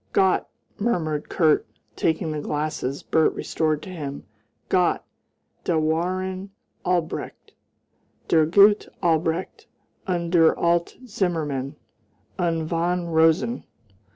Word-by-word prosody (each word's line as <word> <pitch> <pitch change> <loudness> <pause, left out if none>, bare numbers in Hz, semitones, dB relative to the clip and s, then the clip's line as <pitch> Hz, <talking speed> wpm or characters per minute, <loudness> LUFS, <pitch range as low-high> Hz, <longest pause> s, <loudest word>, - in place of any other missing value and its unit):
"Gott!" 190 -1 +2 0.3
murmured 160 -9 -1
Kurt, 160 -4 +3 0.3
taking 160 0 0
the 150 -1 -3
glasses 145 -2 -3
Bert 160 -1 +2
restored 155 -2 -1
to 185 - -8
him 145 -5 -6 0.4
"Gott! 180 -1 +2 0.6
Da 170 - +1
waren 185 +5 -1 0.3
Albrecht 175 -3 -2 0.7
der 160 -2 +4
gute 200 +4 +5
Albrecht 165 +1 0 0.4
und 170 -2 -1
der 165 -3 +5
alte 170 +8 0
Zimmermann 155 - -2 0.6
und 165 -3 0
von 170 +1 -1
Rosen!" 165 +9 +2
165 Hz, 100 wpm, -24 LUFS, 155-180 Hz, 0.7 s, gute